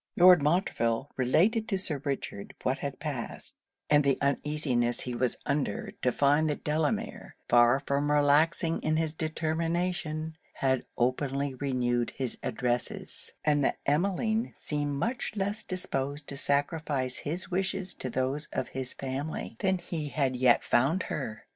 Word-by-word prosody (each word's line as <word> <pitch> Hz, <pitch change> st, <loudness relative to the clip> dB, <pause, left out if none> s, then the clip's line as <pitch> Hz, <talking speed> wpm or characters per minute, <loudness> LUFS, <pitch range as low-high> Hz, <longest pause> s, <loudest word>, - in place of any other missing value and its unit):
Lord 180 Hz, -2 st, +8 dB
Montreville 140 Hz, -6 st, +1 dB
related 195 Hz, -, +2 dB
to 195 Hz, -, 0 dB
Sir 155 Hz, -7 st, 0 dB
Richard 135 Hz, -8 st, -4 dB
what -, -, 0 dB
had -, -, -4 dB
passed, -, -, -5 dB, 0.3 s
and 145 Hz, 0 st, +5 dB
the 140 Hz, -1 st, +2 dB
uneasiness 140 Hz, -4 st, 0 dB
he 125 Hz, -, -4 dB
was 125 Hz, 0 st, 0 dB
under 205 Hz, -, -1 dB
to 125 Hz, -, +2 dB
find 145 Hz, +4 st, +3 dB
that 150 Hz, -, -3 dB
Delamere, 160 Hz, +9 st, -2 dB
far 120 Hz, +2 st, +5 dB
from 140 Hz, +1 st, 0 dB
relaxing 150 Hz, +3 st, +3 dB
in 155 Hz, 0 st, +1 dB
his 160 Hz, -1 st, 0 dB
determination, 160 Hz, 0 st, -2 dB, 0.2 s
had 130 Hz, -2 st, 0 dB
openly 135 Hz, +3 st, 0 dB
renewed 125 Hz, -3 st, -1 dB
his 130 Hz, -3 st, -2 dB
addresses; 120 Hz, -2 st, 0 dB
and 145 Hz, -1 st, +3 dB
that -, -, +1 dB
Emmeline 200 Hz, -, 0 dB
seemed 145 Hz, -1 st, -2 dB
much 235 Hz, -, -2 dB
less 205 Hz, +1 st, -1 dB
disposed 145 Hz, -5 st, -3 dB
to 140 Hz, -, -4 dB
sacrifice 140 Hz, -2 st, 0 dB
his 175 Hz, +6 st, -4 dB
wishes 190 Hz, 0 st, -1 dB
to 130 Hz, -, -5 dB
those 130 Hz, +4 st, -1 dB
of -, -, -2 dB
his 130 Hz, -1 st, -4 dB
family, 135 Hz, +3 st, -4 dB
than 190 Hz, -2 st, +2 dB
he 165 Hz, -3 st, -4 dB
had 135 Hz, -3 st, 0 dB
yet 125 Hz, -1 st, +4 dB
found 150 Hz, +10 st, +2 dB
her. 115 Hz, -7 st, -5 dB
145 Hz, 145 wpm, -29 LUFS, 130-165 Hz, 0.3 s, Lord